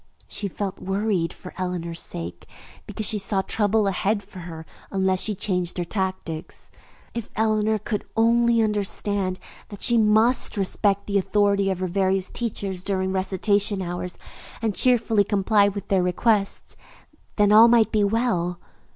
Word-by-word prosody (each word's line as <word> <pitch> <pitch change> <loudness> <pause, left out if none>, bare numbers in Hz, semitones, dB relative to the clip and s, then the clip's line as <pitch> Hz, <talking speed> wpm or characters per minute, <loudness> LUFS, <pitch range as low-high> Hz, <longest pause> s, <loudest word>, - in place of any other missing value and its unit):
She 205 - -2
felt 195 0 -5
worried 195 -3 -1
for 180 - -11
Eleanor's 170 -2 -3
sake, 85 +1 -6 0.4
because 215 - -3
she 210 - +2
saw 195 0 0
trouble 210 +1 +1
ahead 200 +2 0
for 190 -1 -12
her 165 -2 -8 0.3
unless 190 -1 +1
she 215 - -1
changed 180 -3 -1
her 175 - 0
tactics. 185 -4 -5 0.4
If 235 -2 -5
Eleanor 215 0 +1
could 210 0 -4
only 230 0 +3
understand 200 -2 -1 0.3
that 205 - -7
she 235 - +4
must 220 +3 +3
respect 200 +1 +1
the 200 -1 +1
authority 200 0 +1
of 185 -1 -2
her 185 - 0
various 190 +1 0
teachers 200 -5 -1
during 190 0 -1
recitation 195 +2 +1
hours 175 0 -5 0.4
and 220 -2 -1
cheerfully 230 -3 +3
comply 200 +1 +2
with 200 0 -5
their 195 -2 +3
requests, 195 +3 0 0.6
then 205 -1 +3
all 220 +2 +8
might 230 -2 +4
be 210 -1 +2
well. 200 -5 0
200 Hz, 150 wpm, -24 LUFS, 185-215 Hz, 0.6 s, all